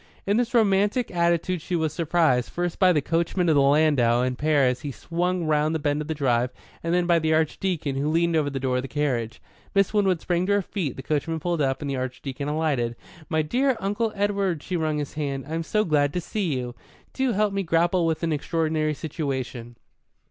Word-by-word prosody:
In 200 +2 +2
this 240 0 0
romantic 210 +2 +2
attitude 170 0 +1 0.2
was 160 -2 0
she - - -14
surprised, 160 -7 +2
first 175 -1 -3
by 185 -2 +6
the 150 -5 +1
coachman 170 +2 0
of - - +5
the 140 - +5
landau 140 -4 +3
and 130 0 -1
pair 145 0 +2
as 125 0 0
he 145 - -4
swung 175 +5 -2
round 155 +1 +1
the - - +2
bend 145 -1 -1
of 150 - -6
the 160 - -2
drive, 125 -4 +1 0.3
and 165 - -2
then 175 0 +2
by 170 -1 +4
the 160 0 +2
Archdeacon, 160 -2 -1
who 145 +2 0
leaned 170 +1 +2
over 150 -2 +2
the 135 -1 -4
door 130 -1 0
of - - 0
the 135 - -6
carriage. 130 -6 -2 0.4
Miss 195 0 +3
Winwood 195 -5 +2
sprang 175 +2 -1
to 200 - +3
her 205 - +3
feet; 175 - -3
the 135 - -8
coachman 155 +3 -1
pulled 170 0 -1
up, 135 0 0
and 145 - -3
the 135 - -2
Archdeacon 130 +2 -4
alighted. 145 -6 0 0.3
"My 160 -1 +1
dear 255 - +1
Uncle 205 +3 -1
Edward" 200 -5 0
she 185 - -3
wrung 155 -2 0
his 145 -2 -4
hand 140 -3 -3
"I'm 165 +2 -2
so 215 +6 0
glad 145 -3 +2
to 180 - 0
see 190 -1 -2
you. 125 -1 -4 0.4
Do 265 -3 0
help 210 0 +1
me 195 - 0
grapple 170 0 +2
with 160 +1 -1
an 165 -1 +1
extraordinary 155 0 0
situation." 130 -6 -4
160 Hz, 220 wpm, -25 LUFS, 140-180 Hz, 0.4 s, by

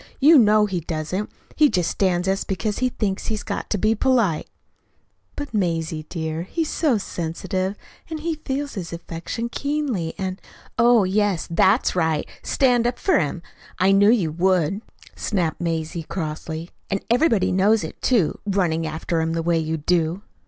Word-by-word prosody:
You 295 +2 +7
know 215 -2 +5
he 190 -4 -2
doesn't. 165 +5 -3 0.3
He 300 -2 +5
just 180 -6 0
stands 185 -2 +1
us 195 +1 +1
because 205 +2 -2
he 255 0 +2
thinks 200 -5 -2
he's 215 -1 -2
got - - -4
to 210 - 0
be 215 +3 +2
polite." 225 -8 +1 0.9
"But, 290 -3 -6
Mazie, 165 -5 -1
dear, 160 -2 -3
he's 315 - -2
so 295 -8 +2
sensitive, 185 +1 -3 0.3
and 315 -2 -5
he 330 +1 -1
feels 290 -2 -4
his 180 -5 -5
affliction 170 +7 -5
keenly, 270 - -2
and 190 0 -4 0.2
" - - -17
"Oh, 235 -4 +6
yes, 195 -1 +1
that's 190 +7 +3
right 160 -3 +1
stand 245 -3 +2
up 245 - -2
for 380 - +2
him! 165 +2 -2 0.3
I 185 +2 +4
knew 200 +1 +5
you 200 -9 +3
would," 185 +2 +1 0.3
snapped 175 -6 -1
Mazie 165 0 -2
crossly. 160 0 -5 0.2
"And 195 -1 -2
everybody 240 - +3
knows 205 +4 +3
it, - - -8
too 220 -12 +2
running 170 -5 +1
after 160 +1 -2
him 160 0 -1
the 165 0 -1
way 170 0 +2
you 160 0 -2
do." 170 +4 0
190 Hz, 165 wpm, -23 LUFS, 165-225 Hz, 0.9 s, You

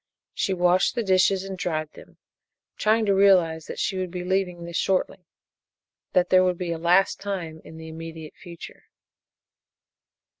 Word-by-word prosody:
She - - -1
washed 180 +4 +2
the 235 - -1
dishes 190 0 +2
and 195 0 -6
dried 155 -4 -3
them, - - -16 0.6
trying 220 +1 +2
to 200 - +2
realize 180 -5 +3
that - - -7
she 190 -1 -1
would 185 -1 -3
be 180 0 -5
leaving 180 -2 -1
this 170 0 -8
shortly 185 -1 -1 0.9
that 180 0 +2
there 185 0 +6
would 180 -1 0
be 175 -1 -3
a 165 - -3
last 180 +4 +3
time 175 -6 -5
in 160 - -12
the 160 0 -9
immediate 160 -1 -9
future. 170 -1 -12
180 Hz, 160 wpm, -24 LUFS, 165-190 Hz, 0.9 s, there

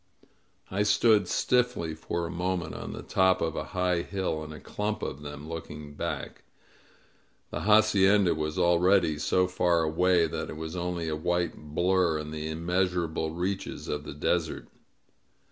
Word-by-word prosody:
I 95 +2 0
stood 105 -1 +4
stiffly 125 -11 +1
for 85 +2 -3
a 85 - -5
moment 90 -1 -2
on - - -6
the - - -7
top 95 -1 +3
of 80 -1 -1
a - - -3
high 90 -2 0
hill, 95 -5 -3
in 75 - -8
a 75 - -9
clump 105 +6 -3
of 70 - -4
them, 75 +1 -8
looking 75 -2 -7
back. - - -5 1.1
The - - -3
hacienda 105 -2 +5
was 75 +1 -3
already 85 -2 +3
so 90 +5 +2
far 90 -2 +2
away 85 +2 +3
that 80 - -4
it 75 - -7
was 80 +2 -5
only 90 -1 -2
a 80 - -1
white 85 +2 -1
blur 85 +2 +1
in 75 0 -6
the 80 0 -4
immeasurable 85 -1 -1
reaches 95 +3 -3
of 75 0 -3
the 70 - -8
desert. 80 +2 -1
85 Hz, 160 wpm, -28 LUFS, 80-95 Hz, 1.1 s, hacienda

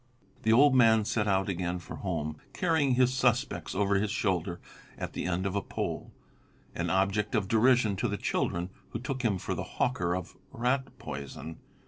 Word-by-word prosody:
The 110 - +2
old 140 +4 +6
man 110 -4 +5
set 110 -1 0
out 95 -1 +2
again 90 -2 -1
for 90 - -8
home, 75 -5 -3 0.2
carrying 160 -7 +2
his 125 0 +3
suspects 125 - 0
over 100 +1 +2
his 105 +1 0
shoulder 95 -5 -1 0.4
at - - -5
the - - -3
end 90 +1 -1
of 100 0 -1
a 100 - +1
pole, - - -4 0.6
an 85 0 -2
object 100 +3 +1
of 105 -3 +1
derision 115 -1 +4
to 110 - 0
the 105 -2 -2
children, 85 -1 -1 0.2
who - - -4
took 130 +1 -3
him 110 -6 +1
for - - -3
the - - -3
hawker 90 -8 +1
of 90 -2 -6 0.2
rat 125 +3 -1
poison. 70 +3 -7
100 Hz, 180 wpm, -29 LUFS, 90-125 Hz, 0.6 s, old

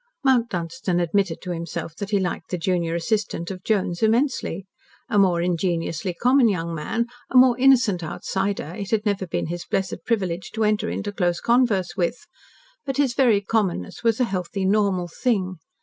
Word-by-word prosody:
Mount 250 -4 +3
Dunstan 180 0 -2
admitted 175 0 0
to 180 - -4
himself 165 -1 -5
that 200 - -5
he 205 -2 +2
liked 180 -3 -3
the 180 - -2
junior 170 -1 0
assistant 180 -1 -1
of 185 -1 -8
Jones 185 -5 0
immensely. 225 - +1 0.4
A 210 -5 +3
more 175 -3 +3
ingenuously 175 0 -1
common 250 +3 +4
young 170 -4 -2
man, 195 +9 -1 0.2
a 255 - +3
more 250 -1 +7
innocent 250 -8 +4
outsider, 190 +1 -3
it 200 -3 -5
had 220 -1 0
never 200 -2 0
been - - -2
his 175 +2 -4
blessed 195 -1 -2
privilege 185 -6 -1
to 220 - +1
enter 215 +1 +1
into 205 0 -3
close 175 -3 0
converse 235 -7 +2
with, 200 - -1 0.6
but 270 - -3
his 275 -4 +2
very 235 -6 +3
commonness 200 - -1
was 230 0 +2
a - - +4
healthy, 190 -2 -2
normal 195 -3 +2
thing. 185 -2 -1
195 Hz, 175 wpm, -23 LUFS, 175-225 Hz, 0.6 s, more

